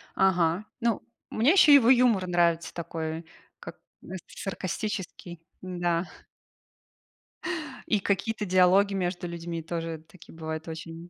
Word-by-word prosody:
Ага. 180 0 +2
Ну, 235 -1 0 0.3
мне 240 +8 +3
ещё 345 -6 +7
его 260 -4 +7
юмор 240 -7 +4
нравится 170 -1 +1
такой, 160 -1 -5 0.3
как, - - -10 0.2
ну, 190 - -8
саркастический, 190 -3 -5 0.2
да. 175 -1 -1 1.8
И 210 -3 +2
какие-то 210 +3 -1
диалоги 185 +2 +4
между 180 -1 -2
людьми 170 -1 -5
тоже 165 -1 -5
такие 175 -2 -16
бывают 160 0 -5
очень, 165 +1 -8
175 Hz, 115 wpm, -27 LUFS, 165-200 Hz, 1.8 s, ещё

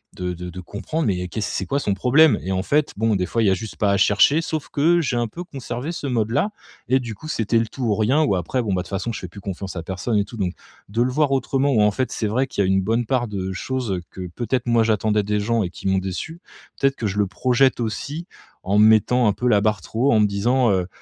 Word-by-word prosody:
de 90 0 -3
de 90 +1 -7
de 90 +2 -8
comprendre 130 - -4
mais 100 -5 +1
y'a 90 0 -4
qu'est-ce 105 +4 -3
c'est - - -2
quoi 140 - 0
son 100 - 0
problème? 135 +10 +4
Et 95 - -4
en 95 0 -1
fait, 145 +9 +1
bon, 110 +1 +1
des 90 - -1
fois 115 +4 0
il 105 - +3
y - - +5
a - - +4
juste 105 +4 -5
pas 100 -1 +1
à 100 - +2
chercher 105 +10 +4
sauf 160 -2 -4
que, 170 +4 +3
j'ai 130 -5 -1
un 120 0 0
peu 170 +11 -7
conservé 135 -3 -5
ce 155 -4 -5
mode-là 120 - 0 0.4
et 130 +2 +3
du 120 -3 -5
coup 130 +9 -11
c'était 115 -5 +1
le 115 - -1
tout 125 +4 -7
ou 110 - +2
rien 130 +9 +2
ou 100 - +2
après 95 +9 -1
bon, 105 -4 -1
bah, 90 - 0
de - - -10
toutes - - -15
façons, 105 +4 -2
je - - -5
fais 90 - -7
plus 100 +3 -12
confiance 95 0 -6
à 85 - -4
personne 95 +5 -2
et 100 - +3
tout. 115 +3 -10
Donc, 95 -3 -1 0.4
de 115 +4 0
le 125 +1 +2
voir 145 0 +1
autrement 135 +1 +1
ou 110 - +3
en 105 0 +4
fait 125 +4 -2
c'est 110 - -1
vrai 130 +6 0
qu'il 100 - -1
y - - +1
a - - +1
une 95 - +3
bonne 115 +5 0
part 120 0 0
de 95 -3 -4
choses, 125 +4 -3
heu, 90 -2 -2
que 95 -1 -7
peut-être 120 +7 -2
moi 120 -1 +3
j'attendais 105 -1 +1
des 105 +1 0
gens 115 +2 +1
et 90 - -3
qui 90 - -7
m'ont 95 - +2
déçu, 95 - -5 0.4
peut-être 135 0 +2
que 115 - -4
je 100 +1 -4
le 100 - +2
projette 130 +6 +2
aussi 145 +9 -4 0.4
en 100 +3 +2
mettant 110 +3 +5
un 105 - +3
peu 125 +5 -2
la 105 -4 +4
barre 105 -1 +1
trop 120 +10 0
haut, - - +4
en 110 - +4
me 105 - +5
disant, 120 +5 +2
heu, 90 -2 0
110 Hz, 290 wpm, -22 LUFS, 100-130 Hz, 0.4 s, y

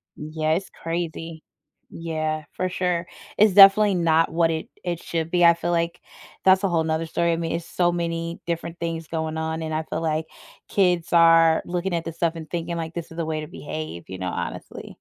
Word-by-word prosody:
Yeah, 155 +1 -2
it's 190 +4 -2
crazy. 165 -1 -5 0.5
Yeah, 155 -2 -3
for 185 - -2
sure. 180 -2 -1 0.3
It's 210 -2 +5
definitely 200 +1 +8
not 165 -1 +2
what 165 0 +2
it 160 -1 -3 0.2
it 175 -2 -3
should 165 -1 -3
be, 175 -1 +4
I 170 - +8
feel 170 +1 -3
like 170 0 -1 0.4
that's 190 0 +5
a 195 - +3
whole 165 -2 +1
'nother 160 0 -1
story, 170 +1 0
I - - +2
mean, 165 -1 -2
it's 170 0 -3
so 175 0 +1
many 170 -1 -3
different 170 0 -4
things 165 -1 -4
going 160 -1 -3
on, 160 0 -2
and 160 -1 -4
I 155 +1 -1
feel 155 - -4
like 160 -1 -1 0.4
kids 180 -4 +1
are 165 -1 +6
looking 175 +1 -2
at 165 - -2
this 165 -1 -6
stuff 170 -1 +1
and 160 -2 -8
thinking, 170 0 -3
like, 165 -1 -4
this 170 -2 -6
is 165 - -11
the 165 - -1
way 155 -1 -2
to 155 - -7
behave, 155 - -7
you 95 - -6
know, 90 0 -4
honestly. - - -6
165 Hz, 210 wpm, -24 LUFS, 160-175 Hz, 0.5 s, definitely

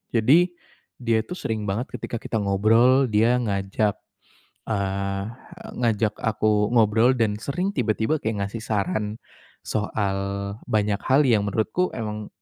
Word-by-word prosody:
Jadi, 155 +11 +4 0.5
dia 115 -2 +1
itu - - -20
sering 110 -1 -3
banget 115 +7 -2
ketika 115 - -4
kita 110 - -2
ngobrol, 115 +7 +4
dia 115 +4 +3
ngajak, 100 -1 0 0.7
eee, 100 -1 -1 0.6
ngajak 110 -2 +1
aku 105 -2 +1
ngobrol 110 +1 +4
dan 110 -3 +1
sering 180 +10 -2
tiba-tiba 115 +5 +1
kayak 105 -3 -1
ngasih 110 +3 -7
saran, 105 +1 -2 0.5
soal 100 -2 -1 0.5
banyak 105 -1 +1
hal 135 +3 +4
yang 110 -4 +3
menurutku 110 - 0
emang, 105 -2 -5
110 Hz, 125 wpm, -24 LUFS, 105-115 Hz, 0.7 s, Jadi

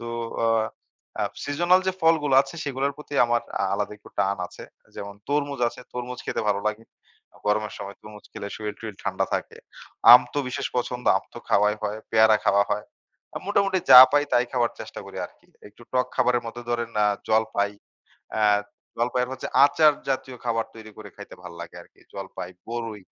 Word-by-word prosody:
তো 115 - -7 0.4
অ - - +3 0.7
অ্যা - - 0 0.2
সিজনাল 175 +6 +3
যে 190 - +2
ফলগুলা 155 -4 +3
আছে 135 +2 -11
সেগুলার 140 0 -1
প্রতি 150 -1 -10
আমার 120 0 +1 0.2
আ - - +2
আলাদা 105 +1 -2
একটু - - -17
টান 100 +2 +1
আছে। - - -12 0.3
যেমন 100 0 -7
তরমুজ 145 -2 -1
আছে, - - -12
তরমুজ 125 0 -5
খেতে - - -2
ভালো 100 -1 +1
লাগে। 110 +1 -2 0.5
অ - - -19
গরমের 105 0 0
সময় 100 0 -7
তরমুজ 105 -1 -13
খেলে 100 - -6
শরীল-টরিল 105 -1 -6
ঠান্ডা - - 0
থাকে। - - -4 0.6
আম 125 - +11
তো 145 - -1
বিশেষ 140 +2 -3
পছন্দ, 125 0 -2
আম - - -3
তো - - -7
খাওয়াই 105 +1 +3
হয়, 105 +1 -3
পেয়ারা 110 -1 +5
খাওয়া 100 +1 +4
হয়। 105 - -1 0.5
আ - - -1
মোটামুটি 200 -1 +2
যা 125 - +13
পাই 145 0 +4
তাই 120 - +4
খাবার 120 -2 +1
চেষ্টা - - -8
করি - - -11
আরকি। - - -27 0.2
একটু 105 +3 -19
টক 125 -1 +2
খাবারের 120 -1 +2
মধ্যে 115 +1 -7
ধরেন 120 -1 -1
আ - - +4 0.2
জলপাই। 110 -2 +1 0.6
অ্যা 110 -1 +2 0.5
জলপাই 125 +2 0
এর 125 - -4
হচ্ছে 130 - -6 0.2
আচার 150 +1 +5 0.2
জাতীয় 130 -1 -3
খাবার 115 -1 0
তৈরি 110 -1 -11
করে 105 -1 -10
খাইতে 100 - -11
ভাল 90 -1 -9
লাগে 85 - -10
আরকি। - - -22
জলপাই, 95 -2 -7 0.2
বরই 115 -3 -5
120 Hz, 185 wpm, -25 LUFS, 105-135 Hz, 0.7 s, যা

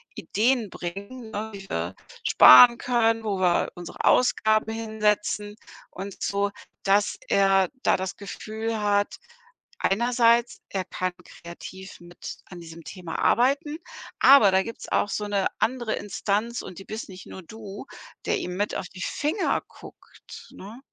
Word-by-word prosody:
Ideen 230 0 0
bringen, 200 +8 -7
ne? 215 +1 -4
Wie 195 -1 -9
wir 85 +2 -3 0.3
sparen 235 - +9
können, 230 -2 +1
wo 200 -3 -1
wir 180 -2 +2
unsere 175 -2 -6
Ausgaben 220 -3 +3
hinsetzen 210 -2 -1 0.4
und 195 +1 -8
so 200 0 0 0.3
dass 200 +1 +2
er 195 -1 +3 0.2
da - - +3
das 190 0 -4
Gefühl 220 +3 -5
hat, 205 0 +1 0.6
einerseits, 235 +2 +2
er 190 -2 -3
kann 185 0 -3
kreativ 185 +3 -11
mit 175 0 -9
an 175 -2 -11
diesem 165 0 -11
Thema 180 -4 -7
arbeiten, 280 +5 +2 0.4
aber 270 -8 +7
da 190 0 +3
gibt's 230 - -8
auch 205 - +1
so 210 - -3
'ne 200 -2 +1
andere 240 -2 0
Instanz 210 +3 -2
und 180 - -10
die 195 - -11
bist 215 -1 -7
nicht 185 0 -11
nur 190 - -10
du, 205 +3 -10 0.4
der - - +1
ihm 180 - -5
mit 205 +1 -1
auf 180 - -4
die 185 - -11
Finger 315 +7 -1
guckt, - - -14
ne? 215 +6 -11
205 Hz, 145 wpm, -25 LUFS, 190-225 Hz, 0.6 s, sparen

